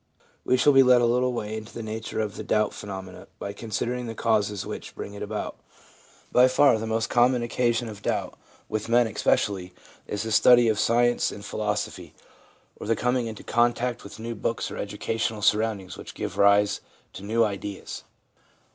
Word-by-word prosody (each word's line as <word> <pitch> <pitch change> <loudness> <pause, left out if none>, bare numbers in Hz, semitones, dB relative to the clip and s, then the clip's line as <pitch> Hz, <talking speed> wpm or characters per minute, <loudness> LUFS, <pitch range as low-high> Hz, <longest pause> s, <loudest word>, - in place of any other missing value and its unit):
We 130 - +2
shall 145 +3 +5
be 135 - +8
led 125 -1 +6
a - - +4
little 125 +2 +2
way 110 -3 -4
into 110 0 -8
the 115 - -5
nature 110 +1 -5
of 105 -2 -3
the - - -6
doubt 105 0 +1
phenomenon 95 -2 -8
by 100 - -5
considering 120 +3 -3
the 115 - -6
causes 105 -3 0
which - - -7
bring 100 - -7
it 100 - -9
about. - - -4 0.7
By 125 +1 +6
far 130 -2 +4
the 110 - -4
most 110 0 0
common 120 0 +3
occasion 120 0 0
of 105 -2 -9
doubt, - - -2 0.3
with 110 +1 -3
men 120 +1 +5
especially, 95 -4 0 0.3
is 105 - -3
the 110 - -4
study 120 +2 +6
of 110 - 0
science 120 +1 +2
and 100 0 -9
philosophy, 105 -1 -3 0.6
or - - -7
the 115 - +2
coming 125 +1 0
into 110 -1 -8
contact 120 +1 +1
with 100 - -10
new 115 +1 -5
books 115 +1 -3
or - - -6
new - - -2
educational 110 -1 -3
surroundings 105 -3 +1
which - - -9
give - - -4
rise 100 0 +4 0.3
to - - -9
new 115 +3 +2
ideas. 100 -1 -4
110 Hz, 185 wpm, -26 LUFS, 105-120 Hz, 0.7 s, be